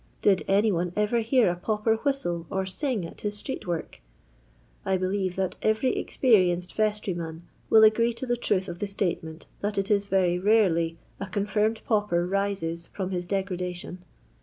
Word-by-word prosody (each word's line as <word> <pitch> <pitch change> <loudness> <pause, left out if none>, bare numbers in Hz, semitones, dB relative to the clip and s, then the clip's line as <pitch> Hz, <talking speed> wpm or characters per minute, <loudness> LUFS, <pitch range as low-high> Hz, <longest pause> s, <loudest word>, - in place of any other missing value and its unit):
Bid 195 -3 +4
any 205 +3 +3
one 175 -1 -1
ever 210 +3 +1
hear 235 +1 +3
a - - -3
pauper 215 +4 0
whistle 175 - -2
or 190 0 -1
ting 210 - -2
at 165 - -10
his 205 0 -3
street 265 -1 -5
work 170 - -4 0.8
1 190 - 0
I - - +2
believe 185 0 -1
that 190 -1 -2
every 220 +4 +1
experienced 180 -8 +2
vestryman 180 -6 -2 0.3
will 220 0 +7
agree 230 +2 +5
to 245 - -5
the 245 -1 +1
truth 195 -5 0
of 175 0 -6
the 205 - -2
statement 170 -5 -3
that 205 0 -2
it 195 +1 0
is 200 -1 +2
very 180 -3 +2
rarely 180 -5 +3 0.2
a 200 - -4
confirmed 210 +3 0
pauper 205 -6 +1
rises 185 -4 -2
from 190 -2 -5
his 175 -1 -3
degradation. 180 -2 -3
195 Hz, 170 wpm, -26 LUFS, 180-215 Hz, 0.8 s, will